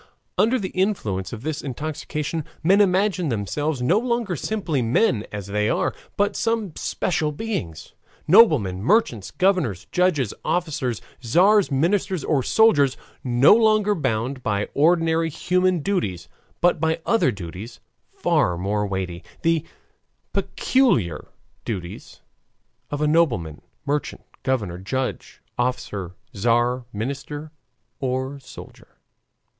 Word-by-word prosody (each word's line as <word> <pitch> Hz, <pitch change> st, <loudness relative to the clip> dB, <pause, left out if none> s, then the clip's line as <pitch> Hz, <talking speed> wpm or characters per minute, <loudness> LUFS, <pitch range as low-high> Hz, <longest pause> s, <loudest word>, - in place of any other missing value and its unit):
Under 240 Hz, +4 st, +3 dB
the 195 Hz, -6 st, -3 dB
influence 110 Hz, -, -1 dB
of 115 Hz, 0 st, -7 dB
this 155 Hz, 0 st, -3 dB
intoxication, 150 Hz, +2 st, -4 dB, 0.2 s
men 195 Hz, +5 st, +5 dB
imagine 190 Hz, -3 st, +2 dB
themselves 125 Hz, +6 st, -2 dB
no 175 Hz, +11 st, +3 dB
longer 235 Hz, -6 st, -1 dB
simply 170 Hz, -5 st, -2 dB
men 115 Hz, -, +1 dB
as 105 Hz, -2 st, -5 dB
they 105 Hz, +2 st, 0 dB
are, -, -, 0 dB, 0.2 s
but 205 Hz, 0 st, +1 dB
some 225 Hz, -7 st, -1 dB
special 155 Hz, -3 st, -1 dB
beings 145 Hz, -, -5 dB, 0.3 s
noblemen, 150 Hz, -, +5 dB
merchants, 120 Hz, -, +1 dB
governors, 180 Hz, -, +1 dB
judges, 160 Hz, -, +1 dB
officers, 145 Hz, -9 st, -1 dB, 0.2 s
tzars, 185 Hz, -, +4 dB
ministers, 175 Hz, +5 st, 0 dB
or 145 Hz, -4 st, +1 dB
soldiers 145 Hz, -, +4 dB, 0.3 s
no 125 Hz, +5 st, +5 dB
longer 215 Hz, -2 st, +4 dB
bound 130 Hz, -, -2 dB
by 100 Hz, -3 st, -1 dB
ordinary 165 Hz, +1 st, +3 dB
human 180 Hz, +2 st, +1 dB
duties, 100 Hz, -, -2 dB, 0.3 s
but 175 Hz, -2 st, +3 dB
by 160 Hz, 0 st, +1 dB
other 225 Hz, -11 st, +3 dB
duties 100 Hz, +4 st, -8 dB, 0.3 s
far 90 Hz, -1 st, +1 dB
more 105 Hz, +3 st, -1 dB
weighty 95 Hz, -2 st, -4 dB, 0.2 s
the 165 Hz, -2 st, +2 dB, 0.7 s
peculiar 125 Hz, -, +1 dB, 0.4 s
duties 90 Hz, -6 st, -6 dB, 0.7 s
of 145 Hz, 0 st, -3 dB
a 150 Hz, -, +2 dB
nobleman, 120 Hz, -, +1 dB, 0.2 s
merchant, 145 Hz, +1 st, -2 dB, 0.2 s
governor, 105 Hz, -10 st, -1 dB
judge, 130 Hz, +8 st, -4 dB, 0.2 s
officer, 100 Hz, -7 st, -2 dB, 0.2 s
tzar, 120 Hz, +4 st, +1 dB
minister, 140 Hz, +7 st, -5 dB, 0.5 s
or 130 Hz, +1 st, -2 dB
soldier. 135 Hz, -, -13 dB
145 Hz, 115 wpm, -23 LUFS, 110-180 Hz, 0.7 s, men